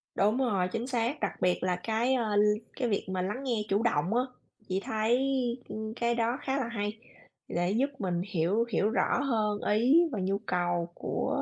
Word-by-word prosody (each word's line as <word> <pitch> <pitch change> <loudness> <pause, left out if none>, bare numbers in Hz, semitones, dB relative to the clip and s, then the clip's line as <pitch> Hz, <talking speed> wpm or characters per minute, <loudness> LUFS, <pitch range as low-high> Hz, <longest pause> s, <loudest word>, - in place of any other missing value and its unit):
Đúng 210 +5 +3
rồi, 200 -9 +1
chính 230 +5 -3
xác. 245 +2 -1
Đặc 205 - -3
biệt 180 0 +2
là 180 -1 +1
cái, 225 +7 0
ơ, 220 -5 0
l 205 - +5 0.3
cái 250 -3 -1
việc 200 - 0
mà 185 -1 -1
lắng 210 +9 -3
nghe 235 -5 0
chủ 200 +3 +2
động 190 -3 +1
á, 250 - +4 0.5
chị 190 +1 +1
thấy, 220 +2 +1 0.5
ưm, 220 0 -4
cái 235 0 +1
đó 235 +2 +1
khá 270 0 -1
là 255 -4 -1
hay, 210 -1 -3 0.5
để 175 +2 0
giúp 260 +6 +2
mình 175 -2 -1
hiểu 190 +6 +1
hiểu 215 -2 +2
rõ 235 - +1
hơn 215 -5 0
ý 260 +10 +5
và 220 - -2
nhu 195 +1 0
cầu 175 -1 0
của - - -1
215 Hz, 200 wpm, -29 LUFS, 190-235 Hz, 0.5 s, l